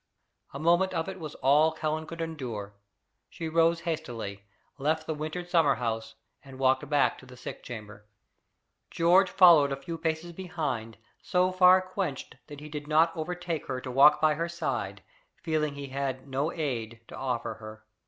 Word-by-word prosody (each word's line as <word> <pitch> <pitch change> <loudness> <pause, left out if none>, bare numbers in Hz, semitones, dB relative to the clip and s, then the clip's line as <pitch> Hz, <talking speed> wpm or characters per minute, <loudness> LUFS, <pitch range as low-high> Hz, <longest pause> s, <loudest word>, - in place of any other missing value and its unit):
A - - -7
moment 175 +4 +2
of 165 -1 -1
it 190 -1 -6
was 155 -3 -7
all 150 +4 +4
Helen 155 0 -2
could 165 +1 -7
endure. 125 -11 -5 0.6
She 165 - -6
rose 165 +1 +3
hastily, 120 - -5 0.3
left 155 +3 0
the 160 - -2
wintered 155 +4 -5
summer 165 -5 +3
house, 115 -2 -3 0.3
and 135 -2 -12
walked 130 0 +2
back 145 -1 +2
to 130 - -15
the 125 0 -13
sick 125 - -8
chamber. 105 -3 -9 0.8
George 180 +3 +4
followed 170 -7 +7
a - - 0
few 165 +4 -7
paces 160 +1 -2
behind, 145 - -4 0.2
so 185 -1 +1
far 185 0 +6
quenched 185 -9 -4
that 145 -1 -10
he 150 - -8
did 150 -1 -7
not 160 +2 +3
overtake 175 0 -4
her 130 -1 -3
to 130 0 -6
walk 140 +4 +6
by 155 0 +4
her 165 +3 -2
side, 170 +1 -3 0.4
feeling 155 -3 0
he 140 -1 -7
had 135 -1 -3
no 140 +4 -1
aid 115 -8 -4
to - - -9
offer 125 -3 -2
her. 110 0 -11
150 Hz, 175 wpm, -28 LUFS, 130-165 Hz, 0.8 s, followed